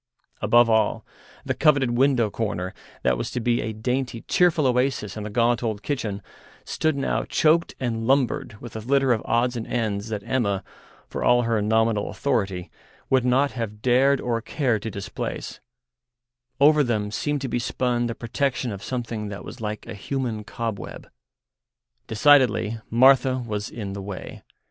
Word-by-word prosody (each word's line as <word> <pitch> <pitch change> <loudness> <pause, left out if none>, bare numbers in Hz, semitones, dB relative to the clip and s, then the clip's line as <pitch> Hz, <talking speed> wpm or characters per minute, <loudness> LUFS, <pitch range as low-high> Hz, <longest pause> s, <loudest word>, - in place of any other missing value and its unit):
Above 120 +3 +5
all, 110 -2 +1 0.4
the - - 0
coveted 140 -5 +3
window 120 -3 +2
corner, 95 -4 -3 0.3
that 60 -1 +2
was - - -3
to - - -3
be 120 0 +1
a 110 - -3
dainty, 125 +2 -2
cheerful 175 -4 +3
oasis 125 -5 0
in 110 - -5
the 105 - -5
gaunt 115 +2 +2
old 110 -3 -3
kitchen, 110 -8 -3 0.4
stood 155 -2 0
now 140 - -1
choked 165 +2 +2
and 115 -3 -2
lumbered 130 -5 +1
with 120 -2 -10
a - - -3
litter 135 +3 +2
of 110 - -1
odds 120 +1 +1
and 115 -2 -4
ends 110 -3 -2
that 105 -2 -4
Emma, 100 -7 0 0.4
for - - -4
all 120 0 +4
her 115 -2 +1
nominal 110 0 +1
authority, 100 -10 -2 0.4
would 130 -2 +4
not 130 +3 +2
have 105 -3 -5
dared 130 +2 +4
or 115 -2 -1
cared 120 -3 0
to 110 - -4
displace; 100 -1 -5 1.0
over 150 +1 +6
them 105 -5 -1
seemed 145 +6 -1
to 135 - -2
be 120 - -1
spun 120 0 0
the 115 - -4
protection 125 +1 -1
of 100 -1 -7
something 120 -4 -4
that 100 -1 -7
was 125 - -9
like 105 -1 -4
a - - -7
human 115 0 -3
cobweb. 115 -1 -5 1.0
Decidedly 115 -2 +4
Martha 130 +2 +5
was 105 -2 -3
in 100 -4 -6
the 100 - -5
way. 95 -1 -7
115 Hz, 165 wpm, -24 LUFS, 105-130 Hz, 1.0 s, over